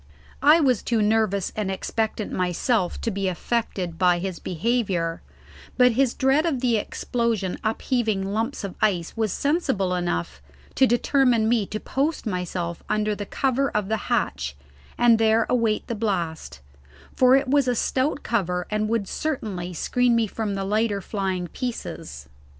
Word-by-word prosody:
I 300 Hz, +4 st, +7 dB
was 255 Hz, -8 st, +2 dB
too 230 Hz, -2 st, 0 dB
nervous 210 Hz, -3 st, +1 dB
and 210 Hz, -3 st, -2 dB
expectant 215 Hz, +2 st, -2 dB
myself 185 Hz, +2 st, 0 dB
to 230 Hz, -, -1 dB
be 195 Hz, -1 st, -2 dB
affected 185 Hz, -3 st, -2 dB
by 180 Hz, -2 st, +4 dB
his 185 Hz, 0 st, -4 dB
behaviour; 180 Hz, -3 st, -1 dB, 0.6 s
but 250 Hz, 0 st, +6 dB
his 255 Hz, +1 st, +1 dB
dread 270 Hz, +3 st, +3 dB
of 320 Hz, -6 st, 0 dB
the 240 Hz, -3 st, +2 dB
explosion 225 Hz, -3 st, -2 dB
upheaving 220 Hz, -2 st, 0 dB
lumps 230 Hz, +3 st, -2 dB
of 195 Hz, -2 st, -4 dB
ice 180 Hz, -6 st, +1 dB
was 220 Hz, -3 st, 0 dB
sensible 270 Hz, -, 0 dB
enough 175 Hz, -, -2 dB, 0.3 s
to 265 Hz, -, +4 dB
determine 240 Hz, -1 st, +3 dB
me 225 Hz, -3 st, +2 dB
to 215 Hz, -, -4 dB
post 285 Hz, +6 st, -1 dB
myself 180 Hz, -3 st, -3 dB
under 215 Hz, 0 st, +1 dB
the 205 Hz, -1 st, -5 dB
cover 275 Hz, 0 st, 0 dB
of 210 Hz, -2 st, -2 dB
the 220 Hz, -, +1 dB
hatch 70 Hz, +1 st, -1 dB, 0.4 s
and 235 Hz, -2 st, +5 dB
there 225 Hz, 0 st, +3 dB
await 230 Hz, -3 st, +1 dB
the -, -, -3 dB
blast, 175 Hz, -, -3 dB, 0.5 s
for 255 Hz, 0 st, +6 dB
it 270 Hz, -, +2 dB
was 275 Hz, 0 st, +3 dB
a 250 Hz, -, +2 dB
stout 270 Hz, +5 st, 0 dB
cover 180 Hz, -6 st, -1 dB
and 215 Hz, 0 st, 0 dB
would 225 Hz, -3 st, 0 dB
certainly 205 Hz, -, -3 dB
screen 245 Hz, +8 st, +1 dB
me 230 Hz, -1 st, +3 dB
from 210 Hz, -1 st, -3 dB
the 195 Hz, -, -2 dB
lighter 210 Hz, 0 st, +1 dB
flying 190 Hz, -2 st, -2 dB
pieces. 165 Hz, -, -6 dB
220 Hz, 155 wpm, -24 LUFS, 190-245 Hz, 0.6 s, I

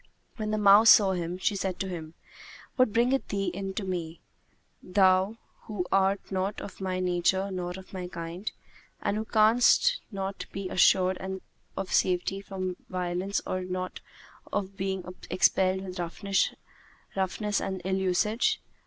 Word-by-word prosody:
When 215 Hz, -2 st, -3 dB
the 215 Hz, -, 0 dB
mouse 210 Hz, +2 st, +7 dB
saw 200 Hz, -3 st, +8 dB
him, 175 Hz, -1 st, -3 dB
she 200 Hz, +2 st, 0 dB
said 190 Hz, -2 st, -2 dB
to 190 Hz, -, -2 dB
him, 165 Hz, -3 st, -7 dB, 0.6 s
"What 255 Hz, -4 st, +3 dB
bringeth 245 Hz, +4 st, +2 dB
thee 195 Hz, -1 st, -1 dB
in 195 Hz, -1 st, -5 dB
to 210 Hz, -, -2 dB
me, 170 Hz, -3 st, -4 dB, 0.6 s
thou 190 Hz, +2 st, +3 dB, 0.3 s
who 205 Hz, -5 st, -3 dB
art 195 Hz, +1 st, +1 dB
not 190 Hz, +2 st, -1 dB
of 200 Hz, -, -9 dB
my 185 Hz, -1 st, -1 dB
nature 185 Hz, +2 st, +1 dB
nor 180 Hz, -1 st, -3 dB
of 190 Hz, 0 st, -13 dB
my 180 Hz, -1 st, -4 dB
kind, 170 Hz, +3 st, -5 dB, 0.5 s
and 205 Hz, -, -1 dB
who 215 Hz, +1 st, -2 dB
canst 230 Hz, -, +4 dB
not 195 Hz, -1 st, -4 dB
be 195 Hz, -1 st, -5 dB
assured 185 Hz, 0 st, +4 dB, 0.6 s
of 195 Hz, -1 st, -3 dB
safety 185 Hz, +2 st, +1 dB
from 185 Hz, -2 st, -4 dB
violence 180 Hz, +2 st, -2 dB
or 185 Hz, -, -2 dB
of 185 Hz, 0 st, -6 dB
not 185 Hz, 0 st, -4 dB, 0.8 s
being 190 Hz, -1 st, -2 dB, 0.3 s
expelled 185 Hz, +1 st, +3 dB
with 185 Hz, -1 st, -7 dB
roughness 195 Hz, +2 st, -2 dB
and 190 Hz, -1 st, -3 dB
ill 190 Hz, 0 st, +1 dB
usage?" 190 Hz, +5 st, +1 dB
190 Hz, 145 wpm, -28 LUFS, 185-200 Hz, 0.8 s, saw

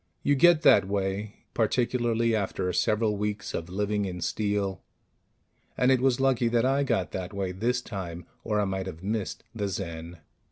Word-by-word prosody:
You 145 Hz, -, +3 dB
get 165 Hz, +3 st, +5 dB
that 100 Hz, -2 st, +6 dB
way 100 Hz, +1 st, -3 dB
particularly 115 Hz, 0 st, +1 dB
after 95 Hz, -3 st, -1 dB
several 105 Hz, +1 st, +1 dB
weeks 105 Hz, 0 st, -3 dB
of 85 Hz, +1 st, -4 dB
living 105 Hz, +2 st, -1 dB
in 90 Hz, -2 st, -5 dB
steel; 100 Hz, 0 st, -1 dB, 1.0 s
and 125 Hz, +1 st, +4 dB
it 130 Hz, -2 st, +3 dB
was 130 Hz, -1 st, +2 dB
lucky 130 Hz, -3 st, +2 dB
that 115 Hz, +1 st, +2 dB
I 135 Hz, +2 st, +2 dB
got 115 Hz, -9 st, 0 dB
that 95 Hz, +1 st, -5 dB
way 95 Hz, -2 st, -2 dB
this 120 Hz, +6 st, -1 dB
time, 90 Hz, -5 st, -6 dB, 0.2 s
or 105 Hz, -2 st, 0 dB
I 105 Hz, -, +2 dB
might 95 Hz, -1 st, -3 dB
have 90 Hz, -1 st, -8 dB
missed 105 Hz, 0 st, -3 dB
the 105 Hz, -3 st, -2 dB
Zen. 85 Hz, -3 st, -5 dB
105 Hz, 170 wpm, -27 LUFS, 95-120 Hz, 1.0 s, that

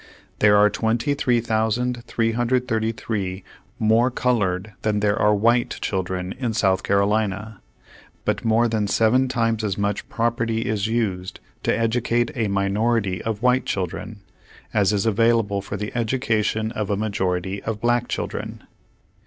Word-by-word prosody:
There 105 Hz, -1 st, +5 dB
are 105 Hz, 0 st, +6 dB
23,333 115 Hz, -3 st, 0 dB, 0.3 s
more 110 Hz, +3 st, +3 dB
colored 105 Hz, -6 st, 0 dB
than 105 Hz, -1 st, 0 dB
there 105 Hz, 0 st, +2 dB
are 105 Hz, 0 st, +3 dB
white 120 Hz, +4 st, +2 dB
children 95 Hz, -1 st, -2 dB
in 120 Hz, -4 st, -2 dB
South 95 Hz, -4 st, +2 dB
Carolina, 100 Hz, +1 st, 0 dB, 0.6 s
but -, -, -1 dB
more 115 Hz, +1 st, +3 dB
than 110 Hz, -2 st, 0 dB
seven 115 Hz, +6 st, +3 dB
times 115 Hz, -3 st, 0 dB
as 100 Hz, -2 st, -1 dB
much 100 Hz, 0 st, -2 dB
property 115 Hz, -1 st, 0 dB
is 110 Hz, -1 st, -1 dB
used 100 Hz, -5 st, -2 dB, 0.2 s
to -, -, +1 dB
educate 115 Hz, +1 st, +1 dB
a 115 Hz, -3 st, 0 dB
minority 100 Hz, 0 st, 0 dB
of 110 Hz, 0 st, -4 dB
white 125 Hz, +1 st, +3 dB
children, 100 Hz, +3 st, -4 dB, 0.5 s
as 105 Hz, -2 st, +3 dB
is 100 Hz, -1 st, 0 dB
available 110 Hz, -2 st, +2 dB
for 100 Hz, +1 st, -5 dB
the 105 Hz, +3 st, -5 dB
education 110 Hz, -2 st, 0 dB
of 105 Hz, -3 st, -3 dB
a 100 Hz, -, 0 dB
majority 95 Hz, -2 st, -2 dB
of 110 Hz, -1 st, -4 dB
black 120 Hz, +1 st, +1 dB
children. -, -, -4 dB
110 Hz, 130 wpm, -23 LUFS, 100-115 Hz, 0.6 s, are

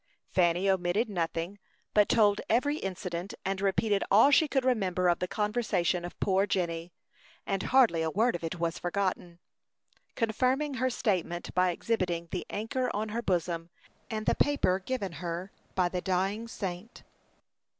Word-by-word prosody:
Fanny 175 Hz, +1 st, +2 dB
omitted 190 Hz, +4 st, +1 dB
nothing, 170 Hz, +2 st, -2 dB, 0.3 s
but 210 Hz, -1 st, +4 dB
told 210 Hz, -3 st, +4 dB
every 285 Hz, +6 st, +2 dB
incident, 185 Hz, -, -4 dB
and 195 Hz, 0 st, -1 dB
repeated 200 Hz, +1 st, +1 dB
all 220 Hz, +8 st, +6 dB
she 310 Hz, +2 st, +5 dB
could 270 Hz, -2 st, 0 dB
remember 190 Hz, -8 st, +1 dB
of 175 Hz, -, +3 dB
the 180 Hz, -, -1 dB
conversation 210 Hz, -5 st, 0 dB
of 175 Hz, -, -8 dB
poor 195 Hz, +1 st, +2 dB
Jenny, 170 Hz, -3 st, -2 dB, 0.5 s
and 195 Hz, -1 st, -1 dB
hardly 240 Hz, -11 st, +4 dB
a 160 Hz, -, 0 dB
word 225 Hz, +7 st, +2 dB
of 170 Hz, -, -6 dB
it 165 Hz, +1 st, -4 dB
was 170 Hz, 0 st, -1 dB
forgotten, 180 Hz, -2 st, -2 dB, 0.8 s
confirming 255 Hz, +6 st, +1 dB
her 260 Hz, -, +3 dB
statement 185 Hz, -8 st, -1 dB
by 180 Hz, 0 st, +3 dB
exhibiting 175 Hz, -3 st, -1 dB
the 180 Hz, -, -4 dB
anchor 230 Hz, +5 st, -2 dB
on 215 Hz, +1 st, -2 dB
her 230 Hz, +3 st, -2 dB
bosom, 170 Hz, -4 st, -1 dB, 0.4 s
and 215 Hz, -2 st, -3 dB
the -, -, +3 dB
paper 280 Hz, -10 st, +2 dB
given 200 Hz, -2 st, -3 dB
her 175 Hz, +3 st, -5 dB, 0.2 s
by 180 Hz, -2 st, +3 dB
the 180 Hz, 0 st, -3 dB
dying 195 Hz, +5 st, -1 dB
saint. 195 Hz, 0 st, -6 dB
190 Hz, 155 wpm, -29 LUFS, 175-220 Hz, 0.8 s, all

